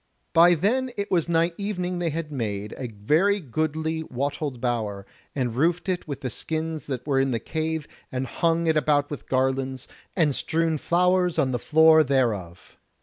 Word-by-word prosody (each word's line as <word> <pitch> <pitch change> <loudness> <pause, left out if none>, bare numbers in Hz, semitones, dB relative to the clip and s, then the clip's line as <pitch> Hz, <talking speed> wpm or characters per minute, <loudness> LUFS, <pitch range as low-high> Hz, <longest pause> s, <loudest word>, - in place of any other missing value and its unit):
By 175 +1 +7
then 245 - +1
it 200 0 -3
was 170 -2 +1
nigh 165 +1 +2
evening 180 -3 -2
they 170 -1 0
had 155 0 -4
made 105 -6 -3
a 130 - -5
very 155 - +1
goodly 160 +2 -2
wattled 140 -1 -3
bower, 110 -5 -2 0.3
and 125 -4 -1
roofed 170 +7 +1
it 180 -2 -2
with 140 -2 -5
the 130 -4 -3
skins 160 +4 -4
that 130 -3 -4
were 140 -2 +1
in 135 0 +2
the 115 -3 -1
cave, 160 +4 -3 0.2
and 130 0 -2
hung 165 +5 0
it 160 -1 +2
about 145 -1 +2
with 145 - -7
garlands, 130 0 0 0.3
and 155 -6 +3
strewn 160 +2 0
flowers 180 +1 +2
on 135 -5 +2
the 120 - -1
floor 160 +3 +6
thereof. 110 - -1
155 Hz, 175 wpm, -25 LUFS, 130-165 Hz, 0.3 s, By